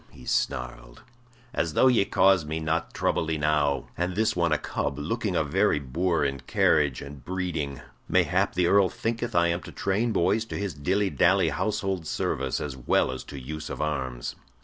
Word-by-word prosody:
he 65 - -15
snarled. - - -2 0.5
"As 80 -9 -1
though - - +5
ye 120 -6 +5
caused 95 -5 +3
me 80 +1 -2
not 80 +1 -1
trouble 80 - 0
enow; 75 -3 +1
and 90 +1 -2
this 110 +2 +1
one 85 -2 +1
a 75 - +3
cub, 70 -2 -3
looking 95 +6 -2
a 80 - +2
very 75 0 +2
boor 80 +4 0
in 70 -1 -2
carriage 70 +2 +2
and 70 -2 -10
breeding. 85 -6 -3 0.3
Mayhap - - +2
the 90 0 +2
Earl 100 +1 +4
thinketh 115 +3 -3
I 85 0 +4
am 85 +1 -1
to - - -10
train 105 +5 0
boys 110 +3 +2
to - - -5
his 100 -3 -3
dilly 95 +7 0
dally 90 -1 +3
household 95 +1 -2
service 70 -2 -1
as 70 -3 -4
well 65 0 +1
as 65 - -6
to 70 - -8
use 75 +4 -6
of - - -6
arms." 65 -6 -3
80 Hz, 185 wpm, -26 LUFS, 70-95 Hz, 0.5 s, though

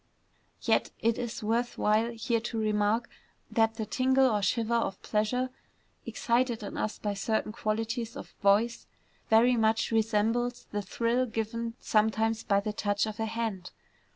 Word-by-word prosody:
Yet - - +2
it 230 0 +1
is 240 0 -4
worth 235 +3 0
while 215 +2 +2
here 230 0 -1
to 230 0 -4
remark 215 +2 +1 0.4
that 225 -1 +2
the 220 -1 -3
tingle 260 +3 +3
or 210 -1 +1
shiver 230 +3 0
of 230 -4 0
pleasure 250 +4 0 0.6
excited 235 -2 0
in 205 - -6
us 215 - -2
by 205 -1 -2
certain 215 +2 -1
qualities 225 +1 -2
of - - -9
voice, 210 +4 +2 0.4
very 235 +3 +5
much 225 0 +2
resembles 225 +2 +1
the 205 - -1
thrill 235 +6 0
given 230 +1 -3
sometimes 220 +1 +1
by 200 -1 +2
the 210 +1 -3
touch 205 -1 0
of 215 0 -6
a 225 - 0
hand. 220 -5 -3
225 Hz, 155 wpm, -29 LUFS, 215-235 Hz, 0.6 s, very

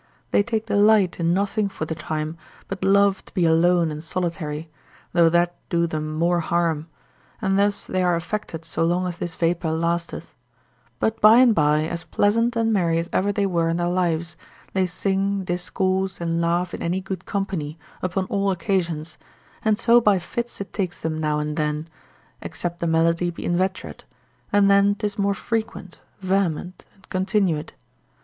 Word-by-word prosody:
They - - +4
take 220 0 -2
delight 205 -3 +3
in 170 0 +2
nothing 200 +2 0
for 155 - -5
the 160 - -3
time, 155 0 -4 0.3
but 195 -1 -5
love 200 0 +3
to - - -17
be 180 - +2
alone 165 0 +3
and 150 0 -6
solitary, 165 -2 -3 0.5
though 170 -2 +5
that 175 +1 +2 0.2
do 170 0 +2
them 155 -2 -3
more 170 +2 +1
harm: 165 -2 0 0.5
and 195 -2 +1
thus 200 0 +1
they 185 - -1
are 180 -1 +2
affected 165 -2 -4
so - - -1
long 175 +2 +1
as 175 -2 -4
this 170 -2 -4
vapour 170 0 0
lasteth; 170 +1 -2 0.7
but 220 0 -1
by 215 +2 +8
and 250 -2 +6
by, 150 -3 +3
as 170 +1 -4
pleasant 230 +6 +1
and 225 -1 +1
merry 170 -5 +2
as 165 +1 -3
ever 200 +2 +2
they 205 0 0
were 170 -3 +1
in 165 - 0
their 175 0 0
lives, 175 -2 -1 0.4
they 190 -1 +2
sing, 195 +2 -1
discourse, 185 +1 -1
and 170 0 -1
laugh 170 +1 0
in - - -5
any 175 +3 0
good 190 -1 -6
company, 180 -6 -3 0.2
upon 185 +1 -1
all 200 +1 0
occasions, 175 -5 -2 0.4
and 215 -1 +2
so 235 +1 +5
by 210 -4 +4
fits 235 +7 -5
it 200 - -7
takes 185 -4 -3
them 160 -1 -3
now 150 -1 0
and 150 +1 -3
then, 150 0 -1 0.5
except 170 +2 -5
the 170 - -1
malady 165 +2 +2
be 170 - -7
inveterate, 185 +2 -2 0.5
and 205 -1 +4
then 200 0 +4
'tis 210 0 -3
more 200 0 +1
frequent, 220 -5 -4 0.2
vehement, 185 -2 -1
and 195 - -22
continuate. 185 -4 0
180 Hz, 175 wpm, -23 LUFS, 165-200 Hz, 0.7 s, by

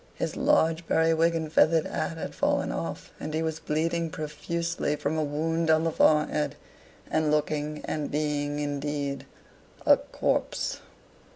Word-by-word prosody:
His - - -3
large 160 +1 +2
periwig 165 +1 +3
and 160 -1 -3
feathered 160 -1 +4
hat 165 - -3
had - - -5
fallen - - +1
off, - - -5
and 155 +1 -4
he 160 - 0
was 160 0 -2
bleeding 165 +2 -1
profusely 155 +1 -2
from 150 +1 -2
a 155 - +1
wound 160 +3 -1
on 160 0 +4
the 165 - +1
forehead, 150 -1 +2 0.6
and 155 -1 +2
looking, 150 0 -1
and 150 -2 -2
being, 145 -1 -1
indeed, 145 -1 -3 0.6
a - - +7
corpse. - - -1
155 Hz, 145 wpm, -27 LUFS, 150-160 Hz, 0.6 s, a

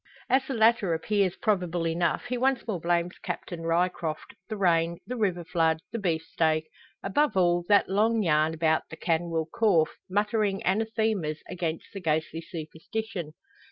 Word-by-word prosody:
As 260 +1 +4
the 270 - -2
latter 220 -6 +4
appears 195 +2 +1
probable 180 -5 0
enough, 170 +1 0
he 245 +1 -2
once 260 -1 +1
more 205 -6 -2
blames 175 +1 0
Captain 175 -2 -5
Ryecroft, 165 -1 -1 0.2
the 215 - -3
rain, 170 -3 +2
the 250 - -4
river 190 -7 0
flood, 165 -2 +1
the 230 - -3
beefsteak 160 -3 0 0.4
above 290 +4 +1
all, 175 -1 +3
that 205 -1 +5
long 215 +3 +2
yarn 155 -1 +2
about 160 -1 +1
the 160 - -9
canwyll 165 -1 0
corph, 180 -8 +3
muttering 205 0 0
anathemas 215 -6 0
against 165 -3 -3
the 195 - -6
ghostly 160 0 -1
superstition. 170 +2 -6
175 Hz, 150 wpm, -27 LUFS, 165-210 Hz, 0.4 s, that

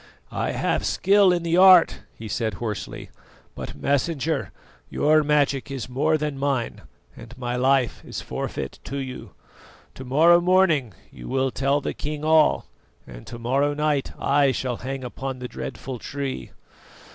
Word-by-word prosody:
"I - - -2
have - - 0
skill 200 -1 +4
in 175 -1 0
the 170 +1 +1
art," 185 -2 +7 0.2
he 110 - -8
said 110 -1 -2
hoarsely; 105 -2 -6 0.4
"but, - - -7
Messenger, 150 +2 -1 0.4
your 155 +1 +3
magic 145 -2 +1
is 135 -3 -5
more 150 +5 +1
than 150 -2 -3
mine, 135 -4 -1 0.3
and 120 +2 -12
my 125 -1 -3
life 130 -1 +1
is - - -6
forfeit - - -5
to 140 - -5
you. 130 -2 -7 0.6
To 130 - -9
morrow 160 +7 +5
morning, 170 - +2 0.2
you - - -11
will 130 0 0
tell 140 +3 +1
the - - -3
king 150 0 -5
all, 155 -1 +4 0.4
and - - -12
to 120 - -7
morrow 135 +5 0
night 150 -2 0
I 140 -1 +3
shall 125 -2 -3
hang 135 +1 -5
upon 130 +1 -5
the 125 0 -6
dreadful 130 0 -7
Tree. 140 +1 -5
140 Hz, 155 wpm, -24 LUFS, 125-155 Hz, 0.6 s, art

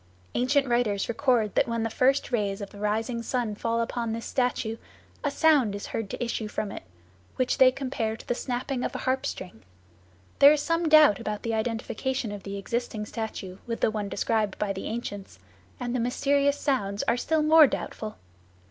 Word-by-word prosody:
Ancient 270 +3 +2
writers 240 -5 +1
record 235 -4 +1
that - - +2
when 230 -1 -1
the 225 - -1
first 270 +4 +2
rays 205 -4 0
of 200 -1 -7
the 205 - -12
rising 220 +3 -1
sun 235 -2 -1
fall 230 +2 -1
upon 230 -1 -2
this 230 0 -5
statue 245 -3 -1 0.5
a 290 - +1
sound 280 -9 +3
is 200 - -6
heard 225 -3 -4
to - - -4
issue 230 -2 -3
from 210 -1 -3
it, - - -7 0.5
which 255 -1 0
they 260 - +8
compare 255 -5 -3
to - - -14
the - - +1
snapping 250 +1 -3
of - - -3
a - - -5
harp 260 0 +1
string. 180 -12 -7 0.8
There 280 +1 +9
is 305 - 0
some 330 0 +1
doubt 305 -9 +7
about 210 -1 -4
the 230 - -1
identification 230 +2 -2
of 205 -1 -6
the 200 0 -6
existing 220 +1 -3
statue 205 -4 -6
with 230 -1 -4
the - - +3
one 210 -2 -3
described 215 -1 0
by 205 -1 -1
the 190 - -5
ancients, 205 - -6 0.4
and 245 -1 -3
the - - +1
mysterious 280 +4 +2
sounds 205 -8 0
are - - +2
still 310 +5 +1
more 310 -1 +8
doubtful. 215 -3 -5
230 Hz, 195 wpm, -27 LUFS, 210-260 Hz, 0.8 s, There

